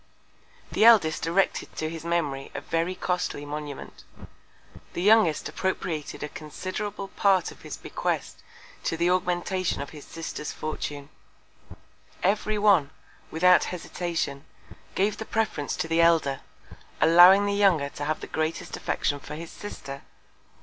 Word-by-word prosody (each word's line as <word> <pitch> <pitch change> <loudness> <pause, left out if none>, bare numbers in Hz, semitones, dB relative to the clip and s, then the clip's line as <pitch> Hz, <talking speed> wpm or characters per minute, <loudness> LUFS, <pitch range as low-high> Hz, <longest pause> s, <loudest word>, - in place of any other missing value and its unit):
The - - +2
Eldest 195 -10 +5
erected 190 +4 0
to 155 - -2
his 160 0 -6
Memory 150 -5 -1
a - - -3
very 165 +3 -1
costly 180 -5 -2
Monument: 145 -1 -7 0.9
The 175 - -3
Youngest 210 -7 +4
appropriated 165 -7 -3
a - - -2
considerable 190 +7 -6
Part 195 -4 +2
of - - -16
his - - -7
Bequest - - -3 0.4
to 165 - 0
the 170 +2 +2
Augmentation 180 0 0
of 140 - -6
his 150 -2 -10
Sister's 165 -2 -6
Fortune: 145 -2 -5 1.1
Every 210 +2 +1
one, 200 -9 +4 0.4
without 180 +2 +5
Hesitation, 165 -5 -3 0.5
gave 200 +2 +1
the - - -4
Preference 215 -12 -1
to - - -2
the 165 +1 +2
Elder, 160 -5 +3 0.6
allowing 180 +4 +8
the 200 - 0
Younger 190 -8 +3
to 145 - -6
have 155 +1 -2
the - - -5
greatest 160 +1 -3
Affection 145 -1 -1
for 150 - -8
his 165 +1 -8
Sister. 140 -9 -8
170 Hz, 135 wpm, -26 LUFS, 150-190 Hz, 1.1 s, allowing